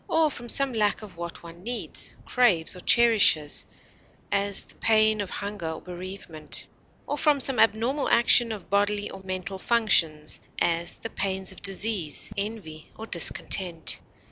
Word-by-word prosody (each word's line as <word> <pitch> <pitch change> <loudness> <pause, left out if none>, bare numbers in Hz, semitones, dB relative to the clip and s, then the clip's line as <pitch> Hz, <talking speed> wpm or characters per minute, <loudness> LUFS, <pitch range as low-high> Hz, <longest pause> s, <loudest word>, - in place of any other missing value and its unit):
or 320 -2 +2
from 240 -2 -9
some 275 +2 +3
lack 215 -1 0
of 200 -4 -11
what 170 0 -7
one 170 0 -12
needs, 240 +4 -4
craves, 205 -12 +2
or - - -10
cherishes 210 -10 +4 0.7
(as, 200 0 0
the - - -17
pain 215 -1 +3
of 195 - -5
hunger 200 -5 -5
or - - -8
bereavement), 180 -3 -5 0.4
or 290 - -3
from 295 -1 +2
some 265 -1 +2
abnormal 230 +6 +2
action 235 0 +4
of 210 -3 -7
bodily 205 +1 0
or 190 - -10
mental 190 0 -5
functions 170 -10 +2 0.2
(as, 170 0 0
the 225 - -7
pains 190 -1 -2
of - - -11
disease, 195 -5 0
envy, 200 -7 -6
or 220 - -7
discontent). 170 -2 +1
200 Hz, 150 wpm, -26 LUFS, 175-225 Hz, 0.7 s, cherishes